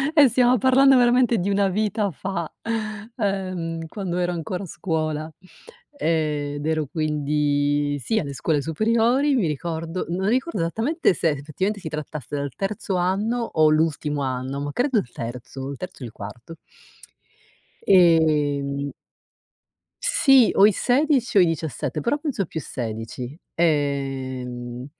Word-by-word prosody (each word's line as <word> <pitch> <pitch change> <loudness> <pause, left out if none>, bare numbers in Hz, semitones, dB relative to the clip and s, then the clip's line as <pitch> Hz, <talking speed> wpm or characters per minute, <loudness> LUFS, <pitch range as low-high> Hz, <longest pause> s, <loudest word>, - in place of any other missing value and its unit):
eh, 295 -3 +8
stiamo 250 +1 +4
parlando 265 +3 +5
veramente 245 -1 +4
di 190 +1 -1
una 200 0 +2
vita 210 +1 0
fa. 170 0 -4 0.7
Ehm, 185 -6 -2
quando 180 0 -4
ero 175 0 0
ancora 175 +3 -4
a - - -5
scuola. 155 -3 -2 0.7
Ehm, 150 - 0
ed 145 0 -5
ero 155 -1 0
quindi 145 -1 0
sì, 215 - 0
alle 140 -6 -4
scuole 150 +2 0
superiori 230 - +2
mi 230 -8 +2
ricordo 165 +3 -3
non 185 +3 -1
ricordo 260 - 0
esattamente 225 - +1
se 165 - +1
effettivamente 155 +8 -2
si 165 - -6
trattasse 150 -2 -6
del 140 -1 -3
terzo 195 -1 -3
anno 195 +6 0
o 155 -8 +3
l'ultimo 155 -2 0
anno 130 +1 -3
ma 145 0 -3
credo 255 -1 +1
il 120 - -1
terzo, 125 +3 -6
il 140 - -6
terzo 180 -5 -8
o - - -4
il 115 - -8
quarto. 115 +10 -9 1.3
Ehm 150 -6 +3 1.1
Sì 280 - +5
o 195 - +7
i 215 - +6
16 255 - +1
o - - +8
i - - +6
17, 160 -1 -3
però 290 - +1
penso 285 -10 -2
più 160 - -5
16, 120 +1 -6 0.2
ehm, 130 -5 -2
165 Hz, 140 wpm, -23 LUFS, 145-205 Hz, 1.3 s, eh